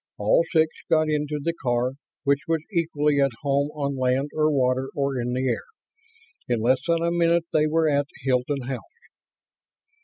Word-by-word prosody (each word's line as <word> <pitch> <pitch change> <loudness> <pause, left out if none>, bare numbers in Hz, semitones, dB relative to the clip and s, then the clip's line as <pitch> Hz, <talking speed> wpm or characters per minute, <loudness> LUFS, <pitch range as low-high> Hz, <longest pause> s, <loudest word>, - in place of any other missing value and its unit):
All - - +3
six 160 -1 +3 0.2
got 155 -1 +3
into 150 0 -1
the 170 +4 -1
car, 125 -1 +1 0.3
which 140 0 +2
was 165 -2 0
equally 150 -4 +1
at 135 - +4
home 140 0 +1
on 140 -2 -2
land 130 +2 0
or 155 0 +2
water 130 -1 +1
or 140 -3 -1
in 120 +1 -2
the 130 +1 0
air. 120 - -1 0.8
In 120 -2 +1
less 125 +4 +2
than 165 0 +2
a 170 - +1
minute 170 -1 +2
they 155 -1 +3
were 160 +1 +2
at 145 -1 +1 0.2
Hilton 130 +1 0
House. 130 0 -3
145 Hz, 175 wpm, -24 LUFS, 130-155 Hz, 0.8 s, at